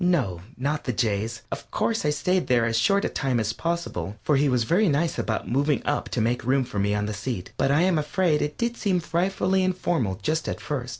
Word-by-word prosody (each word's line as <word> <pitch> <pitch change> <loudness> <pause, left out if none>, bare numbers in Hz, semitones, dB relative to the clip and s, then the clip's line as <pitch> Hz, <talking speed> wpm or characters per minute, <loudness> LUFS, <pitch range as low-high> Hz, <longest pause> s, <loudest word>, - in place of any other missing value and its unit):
No, 130 - +1 0.2
not 145 +4 -2
the 125 - -1
Jay's. 115 0 -1
Of - - -6
course, 225 -7 0
I - - +3
stayed 180 +5 +1
there 120 -2 +3
as 115 -1 0
short 195 - +3
a - - +3
time 130 -4 -1
as 110 0 -1
possible, 165 - -3
for 150 - +3
he 140 +1 +3
was 125 -2 +2
very 180 - +3
nice 155 +3 0
about 110 - -2
moving 140 +3 +1
up 145 - -1
to 120 - -1
make 120 +3 0
room 130 +2 +2
for 110 -5 -4
me 100 +1 +1
on 105 0 0
the 105 - -3
seat, 100 -2 -4
but - - +1
I 145 +3 +4
am 180 -3 +3
afraid 155 +1 +1
it 150 0 -2
did 235 0 -1
seem 195 -6 +1
frightfully 185 +3 +1
informal 175 - 0
just 155 +1 0
at - - -3
first. 130 -4 -4
145 Hz, 235 wpm, -25 LUFS, 115-170 Hz, 0.2 s, I